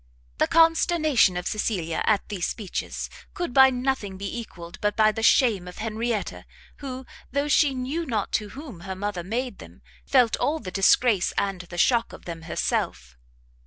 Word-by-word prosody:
The -, -, +3 dB
consternation 325 Hz, -, +4 dB
of 180 Hz, -, -4 dB
Cecilia 185 Hz, -7 st, -1 dB
at 210 Hz, -3 st, +2 dB
these 195 Hz, -5 st, -2 dB
speeches 205 Hz, -6 st, -4 dB, 0.3 s
could 345 Hz, -8 st, -3 dB
by 265 Hz, 0 st, +8 dB
nothing 250 Hz, -6 st, -2 dB
be 200 Hz, +5 st, -4 dB
equalled 175 Hz, -6 st, -10 dB
but 210 Hz, -1 st, 0 dB
by 215 Hz, -1 st, +4 dB
the 225 Hz, -, -5 dB
shame 225 Hz, -6 st, +3 dB
of 180 Hz, -, -10 dB
Henrietta, 225 Hz, 0 st, -3 dB, 0.3 s
who, 260 Hz, -2 st, -7 dB, 0.3 s
though 285 Hz, +1 st, 0 dB
she 290 Hz, -2 st, +3 dB
knew 285 Hz, +6 st, -3 dB
not 220 Hz, -5 st, -2 dB
to 210 Hz, -1 st, -1 dB
whom 275 Hz, -, -9 dB
her 190 Hz, +2 st, -6 dB
mother 195 Hz, -2 st, -3 dB
made 245 Hz, +7 st, -3 dB
them, -, -, -14 dB, 0.2 s
felt 250 Hz, -4 st, +4 dB
all 305 Hz, +2 st, 0 dB
the 185 Hz, -12 st, -7 dB
disgrace 200 Hz, +1 st, +3 dB
and 195 Hz, -2 st, -1 dB
the 175 Hz, -1 st, -10 dB
shock 235 Hz, +6 st, +2 dB
of -, -, -12 dB
them 165 Hz, -2 st, -6 dB
herself. -, -, -2 dB
220 Hz, 170 wpm, -25 LUFS, 190-265 Hz, 0.3 s, by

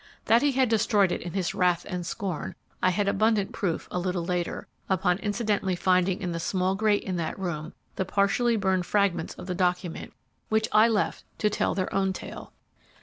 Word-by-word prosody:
That 230 Hz, +1 st, +5 dB
he 285 Hz, -1 st, +2 dB
had 260 Hz, 0 st, +3 dB
destroyed 215 Hz, -4 st, +3 dB
it -, -, -2 dB
in 175 Hz, -, -6 dB
his 190 Hz, -3 st, -1 dB
wrath 180 Hz, -1 st, +1 dB
and 180 Hz, -2 st, -3 dB
scorn 175 Hz, 0 st, -4 dB, 0.3 s
I 185 Hz, -, +4 dB
had 200 Hz, +3 st, 0 dB
abundant 210 Hz, 0 st, +2 dB
proof 190 Hz, -7 st, -2 dB
a 180 Hz, -, -1 dB
little 180 Hz, -1 st, -2 dB
later, 175 Hz, -1 st, -2 dB, 0.2 s
upon 180 Hz, -1 st, +2 dB
incidentally 205 Hz, -3 st, 0 dB
finding 185 Hz, +2 st, +2 dB
in 180 Hz, -2 st, -2 dB
the 170 Hz, -, -3 dB
small 185 Hz, +2 st, 0 dB
grate 205 Hz, +1 st, +2 dB
in 185 Hz, -2 st, -3 dB
that 165 Hz, -2 st, -3 dB
room 170 Hz, -5 st, -4 dB, 0.2 s
the -, -, +1 dB
partially 200 Hz, +5 st, +2 dB
burned 190 Hz, -4 st, 0 dB
fragments 195 Hz, -5 st, +1 dB
of -, -, -9 dB
the 180 Hz, -, -3 dB
document, 180 Hz, -2 st, -1 dB, 0.4 s
which 220 Hz, 0 st, +2 dB
I 215 Hz, +1 st, +6 dB
left 220 Hz, -3 st, 0 dB
to 210 Hz, -, +1 dB
tell -, -, 0 dB
their 185 Hz, -1 st, -2 dB
own 195 Hz, -1 st, +1 dB
tale. -, -, -8 dB
190 Hz, 195 wpm, -27 LUFS, 180-210 Hz, 0.4 s, I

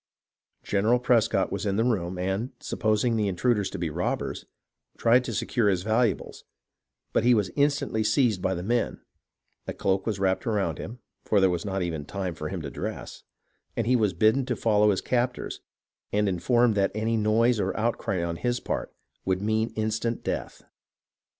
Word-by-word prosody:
General 105 Hz, +4 st, +2 dB
Prescott 120 Hz, -3 st, +2 dB
was -, -, -3 dB
in 100 Hz, -2 st, 0 dB
the 110 Hz, -, +2 dB
room, 95 Hz, -7 st, 0 dB
and, 95 Hz, +6 st, -1 dB
supposing 110 Hz, +1 st, 0 dB
the 105 Hz, -2 st, +1 dB
intruders 105 Hz, +2 st, +1 dB
to -, -, -6 dB
be 85 Hz, -2 st, -2 dB
robbers, 85 Hz, +4 st, -2 dB, 0.5 s
tried 120 Hz, +2 st, +4 dB
to 120 Hz, -, -3 dB
secure 110 Hz, +1 st, +1 dB
his 90 Hz, -2 st, 0 dB
valuables; 110 Hz, 0 st, 0 dB, 0.7 s
but -, -, +2 dB
he 120 Hz, 0 st, +5 dB
was 100 Hz, -4 st, 0 dB
instantly 145 Hz, -6 st, +1 dB
seized 110 Hz, -3 st, +2 dB
by 95 Hz, +1 st, 0 dB
the 90 Hz, -, -4 dB
men, 120 Hz, +4 st, 0 dB, 0.7 s
a -, -, -4 dB
cloak 95 Hz, +1 st, 0 dB
was 110 Hz, -3 st, 0 dB
wrapped 95 Hz, +5 st, 0 dB
around 105 Hz, -3 st, 0 dB
him 115 Hz, +5 st, -7 dB, 0.3 s
(for 105 Hz, -, +2 dB
there 95 Hz, -1 st, +4 dB
was 85 Hz, +1 st, -3 dB
not 95 Hz, -2 st, -1 dB
even 80 Hz, -4 st, -3 dB
time 95 Hz, +3 st, -4 dB
for 75 Hz, -1 st, -5 dB
him 90 Hz, -3 st, -5 dB
to 70 Hz, -, -5 dB
dress), -, -, -6 dB, 0.6 s
and 115 Hz, -, 0 dB
he 125 Hz, +2 st, +3 dB
was 105 Hz, -6 st, +2 dB
bidden 110 Hz, +9 st, +3 dB
to 125 Hz, -, 0 dB
follow 105 Hz, -2 st, +3 dB
his 95 Hz, -, +1 dB
captors, 125 Hz, 0 st, -1 dB, 0.5 s
and 105 Hz, 0 st, +2 dB
informed 120 Hz, +6 st, +2 dB
that 100 Hz, -1 st, +2 dB
any 110 Hz, +1 st, 0 dB
noise 110 Hz, +2 st, +3 dB
or -, -, -1 dB
outcry 105 Hz, -5 st, -1 dB
on 85 Hz, -1 st, -3 dB
his 120 Hz, +3 st, -1 dB
part -, -, -3 dB, 0.3 s
would 95 Hz, -1 st, 0 dB
mean 110 Hz, +1 st, +1 dB
his 110 Hz, -, -21 dB
instant 110 Hz, +2 st, -2 dB
death. -, -, -4 dB
110 Hz, 180 wpm, -26 LUFS, 95-115 Hz, 0.7 s, he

